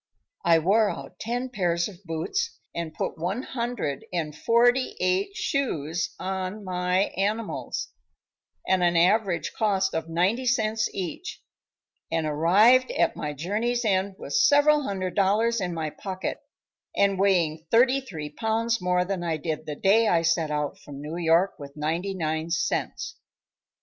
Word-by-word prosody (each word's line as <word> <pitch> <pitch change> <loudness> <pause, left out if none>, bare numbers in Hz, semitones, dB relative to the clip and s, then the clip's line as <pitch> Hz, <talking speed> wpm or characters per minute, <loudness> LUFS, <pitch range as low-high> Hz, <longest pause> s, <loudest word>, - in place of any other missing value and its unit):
I 170 -1 +5
wore 205 +6 +3
out - - -8
ten 245 +3 -3
pairs 175 -7 0
of 200 -2 -13
boots, 180 - -2 0.2
and 170 -2 -4
put 160 - -4
one 190 +9 -2
hundred 235 - -3
and 160 -4 -3
forty 240 +7 +3
eight 185 - 0
shoes 170 - -2
on 190 +2 -4
my 180 +1 0
animals 210 +4 -2 0.8
at 190 -1 +3
an 175 -1 +3
average 185 +1 +2
cost 200 -3 +1
of 160 0 -3
ninety 190 +10 +1
cents 220 -2 +1
each, 195 - -6 0.7
and 165 -1 0
arrived 200 +12 +4
at - - +1
my 150 -1 -4
journey's 220 - -1
end 195 -1 +1
with - - -7
several 300 -8 +5
hundred 190 -8 -3
dollars 215 +4 +2
in 180 -2 -2 0.2
pocket 190 -2 -4 0.6
and 200 -1 +2
weighing 170 -5 +1
thirty 255 +4 +4
three 160 - -7
pounds 225 +4 0
more 180 0 +1
than 190 -1 -3
I 165 -2 -1
did 155 0 -4
the 150 - -3
day 215 +7 +4
I 170 -4 +3
set 165 -1 +1
out 150 -1 -2
from 140 -1 -10
New 150 +3 -6
York 170 +3 +2
with 140 0 -10
ninety 165 +6 -2
nine 160 -1 -2
cents. 170 - -2
185 Hz, 150 wpm, -26 LUFS, 165-225 Hz, 0.8 s, I